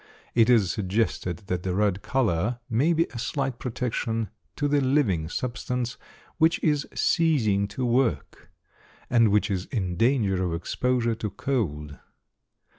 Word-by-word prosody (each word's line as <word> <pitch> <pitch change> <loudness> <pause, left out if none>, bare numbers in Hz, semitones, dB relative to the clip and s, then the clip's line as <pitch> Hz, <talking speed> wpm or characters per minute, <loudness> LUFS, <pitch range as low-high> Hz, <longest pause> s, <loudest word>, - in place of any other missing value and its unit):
It 115 0 +4
is 110 -7 +4
suggested 95 -3 -1
that 90 -2 -2
the 90 0 -2
red 100 -1 +1
color 115 -4 0
may 130 +9 +2
be 165 0 +3
a 120 - -5
slight 135 0 -2
protection 115 -3 -2 0.2
to 145 - 0
the 145 0 +2
living 125 - +1
substance 125 +2 -3 0.4
which 160 +1 +4
is 150 -2 +1
ceasing 120 - +2
to 125 +5 -3
work, 120 0 0 0.6
and 115 -3 +5
which 105 0 +2
is 95 -1 -2
in 95 -9 -2
danger 105 -5 +2
of 85 -2 -1
exposure 120 +7 0
to 110 -1 -4
cold. 80 - -3
115 Hz, 140 wpm, -26 LUFS, 95-130 Hz, 0.6 s, and